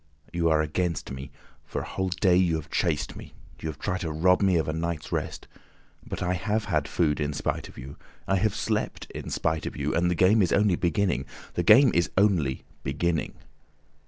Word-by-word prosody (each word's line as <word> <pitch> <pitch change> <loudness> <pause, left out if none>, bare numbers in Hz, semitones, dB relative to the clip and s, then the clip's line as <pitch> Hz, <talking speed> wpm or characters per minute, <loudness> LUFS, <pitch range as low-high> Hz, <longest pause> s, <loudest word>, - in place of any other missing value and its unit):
You 85 -1 +2
are 80 -1 +3
against 85 +2 -2
me. 65 +1 -7 0.3
For - - -4
a - - -6
whole 95 0 -2
day 90 0 +3
you 90 -2 +3
have 80 - -6
chased - - 0
me; - - -11 0.2
you 80 - -4
have 75 - -6
tried 90 +4 -2
to 80 -3 -3
rob 90 +5 +3
me 95 -2 +3
of 80 - 0
a 80 - -1
night's 80 -1 -3
rest. - - -3 0.6
But - - -5
I 90 0 +1
have 105 +4 -1
had - - 0
food 75 -4 +1
in 75 -1 -1
spite 70 - -3
of - - -15
you, 65 +2 -9 0.3
I 95 - +2
have 105 +1 +1
slept 110 0 -2
in - - -6
spite 80 -1 -1
of - - -6
you, - - -1
and 85 +1 +2
the 90 - +1
game 95 +6 +5
is 90 - +2
only 100 -2 +3
beginning. 85 -5 0 0.3
The - - 0
game 115 +8 +7
is 85 0 +2
only 90 -10 +2 0.2
beginning. 80 +4 -1
85 Hz, 210 wpm, -27 LUFS, 80-95 Hz, 0.6 s, game